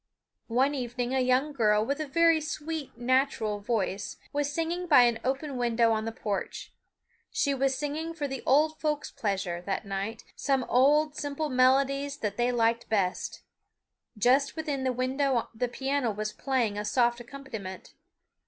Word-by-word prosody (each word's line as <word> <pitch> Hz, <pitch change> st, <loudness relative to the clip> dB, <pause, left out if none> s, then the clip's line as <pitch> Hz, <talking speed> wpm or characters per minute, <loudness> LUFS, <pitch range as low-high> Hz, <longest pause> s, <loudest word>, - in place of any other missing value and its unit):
One 260 Hz, +5 st, +2 dB
evening 245 Hz, -1 st, -3 dB
a 265 Hz, -, +2 dB
young 255 Hz, +4 st, +2 dB
girl 215 Hz, -4 st, +3 dB
with 280 Hz, +4 st, -2 dB
a 310 Hz, -, -3 dB
very 330 Hz, +2 st, +4 dB
sweet 310 Hz, -1 st, -5 dB
natural 240 Hz, -4 st, +1 dB
voice 205 Hz, -2 st, -2 dB, 0.2 s
was 290 Hz, 0 st, 0 dB
singing 335 Hz, +3 st, -2 dB
by 285 Hz, -7 st, +7 dB
an 235 Hz, -2 st, +2 dB
open 270 Hz, +1 st, -2 dB
window 235 Hz, -1 st, +2 dB
on 220 Hz, 0 st, 0 dB
the 225 Hz, -, -2 dB
porch. 205 Hz, -3 st, -4 dB, 0.6 s
She 365 Hz, -11 st, +1 dB
was 270 Hz, 0 st, +1 dB
singing 305 Hz, +4 st, -3 dB
for 295 Hz, -3 st, -2 dB
the 270 Hz, -2 st, -5 dB
old 310 Hz, +4 st, +3 dB
folks' 300 Hz, -1 st, -1 dB
pleasure, 190 Hz, -5 st, -2 dB
that 195 Hz, +1 st, -2 dB
night, 200 Hz, +4 st, -4 dB
some 270 Hz, -2 st, +1 dB
old 290 Hz, +5 st, +3 dB
simple 290 Hz, +1 st, -3 dB
melodies 275 Hz, +2 st, +2 dB
that 210 Hz, -6 st, -3 dB
they 240 Hz, +2 st, +1 dB
liked 230 Hz, -1 st, +1 dB
best. 195 Hz, -4 st, -1 dB, 0.7 s
Just 255 Hz, +6 st, +3 dB
within 295 Hz, -5 st, -2 dB
the 260 Hz, -, +2 dB
window 255 Hz, 0 st, 0 dB
the 240 Hz, +2 st, -1 dB
piano 270 Hz, +1 st, -1 dB
was 215 Hz, 0 st, -3 dB
playing 240 Hz, -7 st, 0 dB
a -, -, -2 dB
soft 240 Hz, +2 st, +2 dB
accompaniment. 235 Hz, -7 st, -8 dB
255 Hz, 160 wpm, -28 LUFS, 225-285 Hz, 0.7 s, by